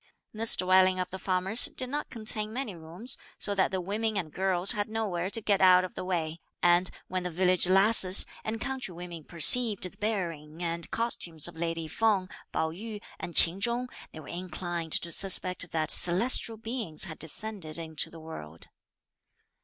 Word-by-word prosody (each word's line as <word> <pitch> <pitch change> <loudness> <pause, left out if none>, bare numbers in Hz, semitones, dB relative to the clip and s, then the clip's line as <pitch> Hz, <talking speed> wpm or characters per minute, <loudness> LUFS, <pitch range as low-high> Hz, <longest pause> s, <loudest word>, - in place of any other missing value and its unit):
This 225 +1 +6
dwelling 185 0 +3
of 180 - -4
the 190 - -7
farmer's 190 +4 +2
did 255 - 0
not 295 +3 -5
contain 215 -2 +2
many 245 -3 -5
rooms 170 +10 -1 0.2
so 205 - +3
that 195 -1 +1
the 190 - -3
women 210 +4 -3
and 160 -6 -5
girls 190 0 +1
had 205 0 -3
nowhere 195 -5 -3
to 225 - -4
get 200 -2 0
out 185 -1 +6
of 185 - -7
the - - -7
way; 170 -3 -4 0.2
and 175 +1 +3 0.2
when 185 0 -4
the 180 - -5
village 180 +1 +2
lasses 195 0 +5 0.2
and 220 +1 -4
country 260 -8 -5
women 175 -2 -9
perceived 210 +6 +3
the 185 - -6
bearing 170 -7 -5
and 170 0 -4
costumes 175 -9 0
of 175 - -10
lady 165 -1 -4
Feng, 200 0 0 0.2
Pao 160 0 -2
yü, 210 +5 -8 0.2
and 175 - -8
Ch'in 175 +4 +4
Chung, 240 +3 -2 0.2
they 155 - -11
were 145 - -13
inclined 175 -2 -6
to 170 - -2
suspect 185 -1 +2
that 155 -1 -1
celestial 220 +5 +5
beings 225 -8 -3
had 165 -4 -4
descended 165 -1 -5
into 160 -2 -5
the 165 - -13
world. 85 - -10
185 Hz, 175 wpm, -27 LUFS, 170-215 Hz, 0.2 s, This